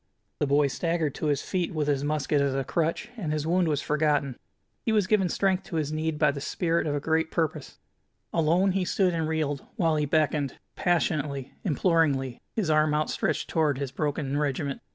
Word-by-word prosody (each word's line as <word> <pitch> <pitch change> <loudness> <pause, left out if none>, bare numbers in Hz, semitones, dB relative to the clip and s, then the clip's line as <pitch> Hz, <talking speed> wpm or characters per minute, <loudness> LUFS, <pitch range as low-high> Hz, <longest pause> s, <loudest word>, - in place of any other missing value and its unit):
The 145 - +1
boy 145 +1 +4
staggered 165 +1 -1
to 155 - -3
his 145 -2 +1
feet, 180 -3 -2
with 150 -2 0
his 140 -1 +1
musket 145 -1 +1
as 140 -1 +1
a 135 - 0
crutch, 165 - -1
and 170 -9 -3
his 155 -1 -1
wound 175 +1 +2
was 150 -2 0
forgotten. 150 -3 +1 0.5
He 225 - 0
was 210 -3 +3
given 195 -2 +2
strength 190 0 +1
to 170 - -6
his 155 -2 -1
need 155 0 -1
by 150 -2 +4
the 140 -1 -6
spirit 165 +2 0
of 145 - 0
a - - 0
great 160 +2 0
purpose. 160 -3 -2 0.6
Alone 170 +4 +3
he 190 0 0
stood 180 0 +1
and 165 -2 -1
reeled, 150 -3 -1
while 165 -3 +2
he 150 -1 0
beckoned, 150 -2 +1 0.2
passionately, 150 -6 0
imploringly, 150 - +1
his 215 -6 0
arm 155 -1 +3
outstretched 155 0 -1
toward 155 -4 +1
his 140 -2 -3
broken 145 0 -2
regiment. 140 -1 -2
155 Hz, 195 wpm, -27 LUFS, 145-165 Hz, 0.6 s, boy